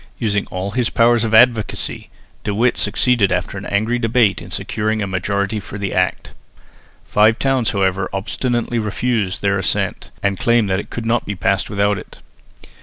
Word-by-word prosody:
Using 105 Hz, -4 st, -1 dB
all 95 Hz, +2 st, -4 dB
his 125 Hz, 0 st, 0 dB
powers 120 Hz, 0 st, +3 dB
of 110 Hz, -1 st, +1 dB
advocacy, 115 Hz, -2 st, +2 dB, 0.3 s
De 105 Hz, -, -2 dB
Witt 120 Hz, +3 st, +2 dB
succeeded 120 Hz, -7 st, +2 dB
after 90 Hz, +2 st, -1 dB
an 95 Hz, -, -8 dB
angry 110 Hz, +4 st, 0 dB
debate 115 Hz, -3 st, +2 dB
in -, -, -10 dB
securing 110 Hz, 0 st, -2 dB
a 105 Hz, -, -1 dB
majority 100 Hz, +2 st, -1 dB
for 100 Hz, 0 st, -8 dB
the 100 Hz, -2 st, -3 dB
Act. 90 Hz, 0 st, -1 dB, 0.7 s
Five 110 Hz, +2 st, +3 dB
towns 135 Hz, -4 st, +1 dB
however 95 Hz, -2 st, 0 dB
obstinately 120 Hz, +4 st, -2 dB
refused 105 Hz, -3 st, -1 dB
their 100 Hz, -1 st, +2 dB
assent, 95 Hz, -, -1 dB
and 100 Hz, -1 st, 0 dB
claimed 115 Hz, -5 st, +2 dB
that 95 Hz, -, +1 dB
it -, -, -7 dB
could 115 Hz, -, -5 dB
not 115 Hz, +1 st, 0 dB
be 105 Hz, -, -3 dB
passed 95 Hz, +1 st, 0 dB
without 100 Hz, 0 st, +1 dB
it. -, -, -13 dB
105 Hz, 175 wpm, -19 LUFS, 100-115 Hz, 0.7 s, powers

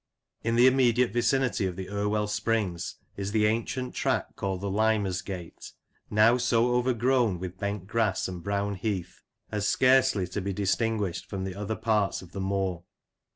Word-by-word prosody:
In 115 Hz, +1 st, +1 dB
the 120 Hz, +1 st, +6 dB
immediate 125 Hz, -3 st, +4 dB
vicinity 120 Hz, -4 st, +1 dB
of 90 Hz, -, -4 dB
the 95 Hz, 0 st, -6 dB
Irwell 105 Hz, +1 st, 0 dB
springs 105 Hz, -4 st, -1 dB, 0.2 s
is 100 Hz, +1 st, -3 dB
the 110 Hz, -1 st, +3 dB
ancient 115 Hz, +4 st, -1 dB
track -, -, -1 dB
called 95 Hz, -2 st, -3 dB
the 100 Hz, -, -3 dB
"Limersgate," 100 Hz, -4 st, -1 dB, 0.4 s
now 110 Hz, +3 st, +5 dB
so 120 Hz, 0 st, +2 dB
overgrown 125 Hz, -3 st, +2 dB
with 90 Hz, +1 st, -7 dB
bent 100 Hz, -2 st, -3 dB
grass 110 Hz, -2 st, 0 dB
and 90 Hz, -2 st, -6 dB
brown 100 Hz, +2 st, -1 dB
heath 95 Hz, -2 st, -4 dB, 0.3 s
as 105 Hz, -1 st, -1 dB
scarcely 130 Hz, -6 st, +4 dB
to 100 Hz, -, -3 dB
be 100 Hz, +1 st, -2 dB
distinguished 100 Hz, -1 st, -1 dB
from 95 Hz, -1 st, -4 dB
the 95 Hz, -1 st, -4 dB
other 105 Hz, +3 st, -3 dB
parts 105 Hz, -4 st, 0 dB
of 90 Hz, -, -14 dB
the 100 Hz, -, -5 dB
moor. 95 Hz, -3 st, -1 dB
105 Hz, 160 wpm, -28 LUFS, 95-115 Hz, 0.4 s, the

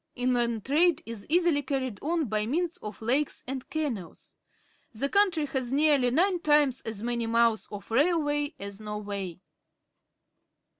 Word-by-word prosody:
Inland 240 Hz, -3 st, 0 dB
trade 320 Hz, +3 st, +3 dB
is 225 Hz, -3 st, -7 dB
easily 335 Hz, -3 st, +3 dB
carried 260 Hz, -6 st, -3 dB
on 325 Hz, +1 st, 0 dB
by 215 Hz, -2 st, -1 dB
means 335 Hz, +6 st, -1 dB
of 210 Hz, +1 st, -8 dB
lakes 270 Hz, +6 st, 0 dB
and 265 Hz, 0 st, -5 dB
canals. 260 Hz, -, -5 dB, 0.6 s
The 230 Hz, +6 st, 0 dB
country 370 Hz, -6 st, +3 dB
has 265 Hz, -3 st, -3 dB
nearly 285 Hz, -3 st, +3 dB
nine 355 Hz, +8 st, +2 dB
times 295 Hz, -5 st, +3 dB
as 220 Hz, -1 st, -6 dB
many 235 Hz, -1 st, -1 dB
miles 230 Hz, -1 st, +2 dB
of 205 Hz, +1 st, -9 dB
railway 295 Hz, +1 st, +1 dB
as 200 Hz, 0 st, -7 dB
Norway. 205 Hz, -4 st, -5 dB
260 Hz, 140 wpm, -28 LUFS, 225-300 Hz, 0.6 s, trade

